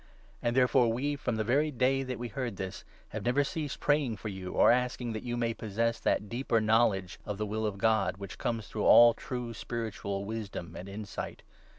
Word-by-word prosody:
And 120 0 0
therefore 125 -2 +4
we, 140 +5 -1
from 125 -4 -2
the 110 - 0
very 140 +7 +2
day 135 0 +2
that 130 -2 -4
we 120 0 -5
9 - - -19
heard 125 -6 -3
this, 95 0 -5 0.3
have - - -5
never 125 +4 +3
ceased 155 -1 -4
praying 145 -7 +1
for 110 - -5
you, 95 -2 -6
or - - +6
asking 125 -1 0
that 110 - -4
you 120 -1 -3
may 115 -1 0
possess 115 +2 -1
that 105 - 0
deeper 120 +1 0
knowledge 110 -4 +2
of 105 -1 -4
the 105 - -1
will 110 +1 -1
of 100 -2 -4
God, 110 -1 +2
which 100 -2 -8
comes 115 -3 -2
through 105 - -3
all 120 0 +9
true 125 0 -5
spiritual 105 -4 -4
wisdom 100 -6 -5
and 95 +3 -7
insight. 105 +1 -6
115 Hz, 210 wpm, -30 LUFS, 105-125 Hz, 0.3 s, all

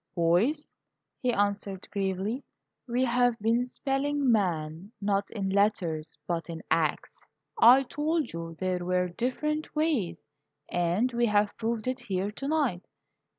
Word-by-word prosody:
"Boys," 190 - +2 0.5
he 250 - +1
answered, 200 -3 -1
gravely, 200 +5 -2 0.4
"we've 245 -1 +2
been 230 +3 +1
spelling 275 +1 0
'man,' 175 -3 0
not 200 -1 0
in 195 -4 -3
letters, 185 -6 0
but 170 -1 -3
in 165 -1 -6
acts. 160 -2 0 0.4
I 250 +4 +8
told 300 +4 -1
you 165 -1 -6
there 185 -1 -1
were 180 0 +1
different 300 - -2
ways, 265 - 0 0.4
and 175 +8 +1
we 235 0 +2
have 205 -1 +2
proved 230 0 -2
it 255 +1 -1
here 200 -4 -2
tonight. 275 - -1
210 Hz, 125 wpm, -28 LUFS, 180-250 Hz, 0.5 s, I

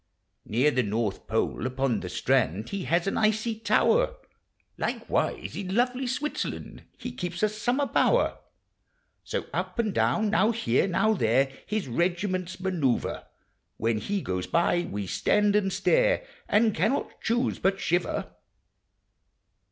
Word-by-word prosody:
Near 125 +8 +2
the 130 - +2
North 105 -2 -2
Pole, 110 +2 0
upon 130 -3 0
the 90 - -6
si - - -5
mud, 110 -6 +2
He 200 -2 -4
has 170 +1 +1
an 195 - 0
icy 220 +1 +1
tower; 460 - +3 0.6
Likewise - - -2
in 190 -1 -4
lovely 250 +2 +1
Switzerland 290 +4 -4
He - - -6
keeps 180 +3 -4
a 215 - +4
summer 245 +7 0
bower. - - +2 0.8
So - - -3
up - - -3
and 220 -4 0
down— 215 -1 +2
now 215 0 +4
here— 195 - +1
now 215 +4 +2
there 135 - +2 0.2
His 210 -6 -2
regiments 185 - -1
manoeuvre; 170 -10 -1 0.5
When 115 0 0
he 200 - -2
goes 90 -1 -2
by, 175 +1 +2
we 100 0 -3
stand 205 - +2
and 195 -2 +2
stare, - - +2 0.2
And 215 +1 +4
cannot 215 - -1
choose 240 +3 0
but 195 +1 +1
shiver. 175 -1 -1
190 Hz, 140 wpm, -27 LUFS, 130-220 Hz, 0.8 s, a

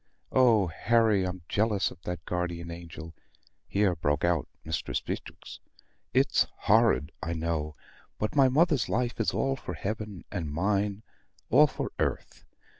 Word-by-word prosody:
Oh, 115 -6 +5
Harry, 105 +3 +2
I'm 90 -1 -6
jealous 105 -2 +1
of 85 - -14
that 90 -1 -5
guardian 85 -1 -3
angel!" 85 -1 -9 0.5
here 100 -3 +2
broke 75 -2 0
out 85 -3 +1 0.2
Mistress 80 0 -2
Beatrix. - - -7 0.5
"It's - - +3
horrid, 110 -8 +3
I 85 - -2
know; 80 -2 -2 0.4
but 105 +7 -2
my 135 -2 +6
mother's 150 -2 +3
life 120 +1 -1
is - - +2
all 135 0 0
for 90 -9 -7
heaven, 105 +2 -5
and 85 -7 -3
mine 100 +5 0 0.5
all - - +7
for - - -4
earth. - - -2
95 Hz, 140 wpm, -28 LUFS, 85-110 Hz, 0.5 s, all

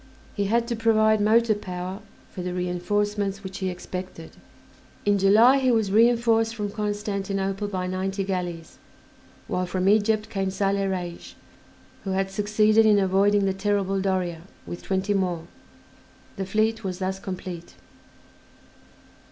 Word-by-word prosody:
He 205 - -1
had 230 +3 +1
to 235 - -1
provide 220 -1 +3
motor 225 +2 +4
power 185 -1 -6 0.3
for 185 - -6
the 180 0 -4
reinforcements 195 +3 -1
which 190 0 -7
he 190 -1 -1
expected. 180 -2 -7 0.7
In 205 -1 +3
July 220 +8 +6
he 260 -1 +2
was 220 -5 +2
reinforced 230 0 +3
from 205 -2 -3
Constantinople 200 -1 -2
by 185 -2 -3
ninety 190 +2 -2
galleys, 175 -4 -4 0.7
while 180 0 -1
from 185 +1 -1
Egypt 215 +1 +3
came 195 -3 -2
Saleh 195 0 0
Reis, 175 -2 -5 0.7
who 195 - -2
had 195 0 -1
succeeded 215 +2 +3
in 215 -2 +5
avoiding 200 +1 +3
the 195 - +1
terrible 195 -1 0
Doria, 185 -4 -1 0.2
with 175 - -7
twenty 190 +1 -1
more; 180 -4 -1 0.9
the 195 -2 -4
fleet 220 +3 0
was 185 -2 -3
thus 190 0 -3
complete. 185 -3 -7
195 Hz, 135 wpm, -25 LUFS, 185-215 Hz, 0.9 s, July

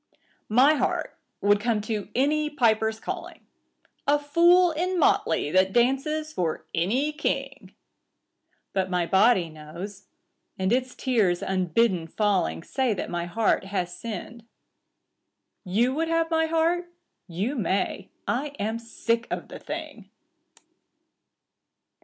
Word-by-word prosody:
My 255 +7 +6
heart 275 -4 -1 0.3
would 205 0 +4
come 225 0 0
to 210 -1 -4
any 300 +4 +2
piper's 220 -6 +1
calling - - -7 0.3
— - - -40
A 290 +1 +5
fool 340 +5 +4
in 360 +4 -1
motley 220 - +2
that 185 +2 +3
dances 305 +6 +1
for 170 -3 -2
any 240 - +1
king; 300 +1 -3 1.0
But 190 -1 0
my 180 -2 +1
body 190 0 +4
knows, 170 +6 -9 0.5
and 190 +3 +1
its 255 0 -1
tears 215 -9 +1
unbidden 185 -1 +1
falling 185 - 0
Say 260 -5 0
that - - -5
my 170 -1 -2
heart 200 +2 +1
has 180 -3 -3
sinned. 225 +3 -7 1.2
You 225 +7 +1
would 325 +3 -1
have 330 0 0
my 320 0 +2
heart? 335 +2 +1 0.4
You 195 - -2
may. 195 -4 -1 0.2
I 285 +3 -2
am 220 +3 -2
sick 230 0 -2
of - - -4
the - - -8
thing. - - -7
230 Hz, 125 wpm, -26 LUFS, 190-290 Hz, 1.2 s, My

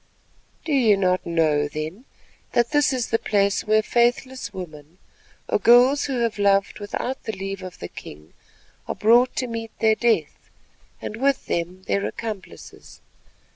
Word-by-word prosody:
"Do 315 - -1
you 230 -7 +4
not 185 -2 0
know, 155 -3 +2
then, 155 - -6 0.5
that 240 +1 +2
this 295 -2 +3
is 255 -3 -2
the 225 - +2
place 200 -1 +1
where 215 0 +3
faithless 240 0 0
women, 165 -4 -10 0.5
or - - +1
girls 250 +4 +5
who 260 -4 -2
have 230 -3 -1
loved 200 0 +2
without 225 +5 -4
the 220 - -3
leave 195 0 -5
of 185 -1 -9
the 85 - -7
king, 75 -1 -12 0.5
are - - -3
brought 240 +4 +4
to 255 - -1
meet 230 -1 -5
their 220 -1 +3
death, 235 +1 -1 0.5
and 215 - -5
with 275 +2 +1
them 175 +2 -3
their 200 - 0
accomplices. 215 -5 -8
215 Hz, 155 wpm, -23 LUFS, 185-240 Hz, 0.5 s, girls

